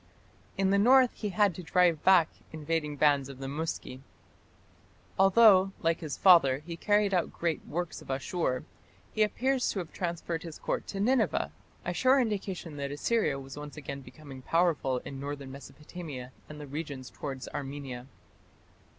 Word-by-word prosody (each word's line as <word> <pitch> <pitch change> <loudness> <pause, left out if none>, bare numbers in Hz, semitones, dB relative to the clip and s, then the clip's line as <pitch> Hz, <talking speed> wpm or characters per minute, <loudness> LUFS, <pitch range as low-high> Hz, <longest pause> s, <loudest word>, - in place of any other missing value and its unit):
In 195 0 +2
the 200 - +4
north 255 +3 +6
he 210 - -4
had 200 0 +2
to 180 - -8
drive 175 -2 +2
back 185 -4 +6 0.2
invading 155 -1 -2
bands 140 -2 +3
of 135 - -9
the 135 - -7
Muski. 145 -3 -4 1.2
Although, 195 -1 +6
like 165 0 +2
his 150 -5 -5
father, 150 -7 +5
he 170 -1 -5
carried 205 +3 +2
out 180 -2 +1
great 170 -2 -2
works 175 +2 -4
at - - -14
Asshur, 135 0 -1 0.5
he 215 - -1
appears 255 +4 +1
to - - -3
have 175 -4 -5
transferred 170 -2 -3
his 165 -4 -8
Court - - -3
to 195 - -5
Nineveh, 220 - +1 0.3
a 180 - -1
sure 260 +8 +4
indication 195 - -3
that 140 -1 -3
Assyria 145 0 0
was 135 +1 -10
once 150 +1 -9
again 140 -1 -6
becoming 135 -1 -12
powerful 160 -4 +1
in 135 - -7
northern 140 -1 -6
Mesopotamia 140 -1 -9 0.2
and 150 0 -9
the 150 - -7
regions 140 -2 -6
towards 135 -3 -6
Armenia. 135 -3 -6
165 Hz, 160 wpm, -29 LUFS, 140-190 Hz, 1.2 s, north